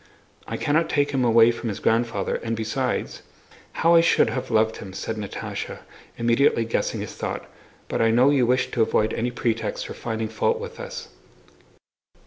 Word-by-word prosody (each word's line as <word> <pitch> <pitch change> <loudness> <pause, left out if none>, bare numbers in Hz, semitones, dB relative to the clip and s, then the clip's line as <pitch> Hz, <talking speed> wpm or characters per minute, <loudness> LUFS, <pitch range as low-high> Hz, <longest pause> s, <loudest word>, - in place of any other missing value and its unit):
"I - - -3
cannot 155 +3 +1
take 145 -1 +1
him 135 -2 +1
away 115 -1 +6
from 115 0 -5
his 100 - -4
grandfather, 115 +1 0
and 115 0 -3
besides..." 125 +4 -2 0.5
"How 165 +1 +3
I 165 - +7
should 165 - +3
have 130 0 -4
loved 110 -1 +2
him!" 95 -2 -9
said 95 +3 -4
Natásha, 105 -2 -5 0.4
immediately 115 0 +3
guessing 115 - -1
his - - -6
thought; - - -4 0.4
"but - - -1
I 115 - +4
know 125 +5 +5
you 130 -4 +3
wish 125 +1 +1
to 120 - 0
avoid 110 0 +2
any 120 +2 -1
pretext 115 -2 -2
for - - -6
finding 110 -1 -3
fault 465 - 0
with 475 0 -8
us." - - -7
115 Hz, 175 wpm, -24 LUFS, 110-135 Hz, 0.5 s, I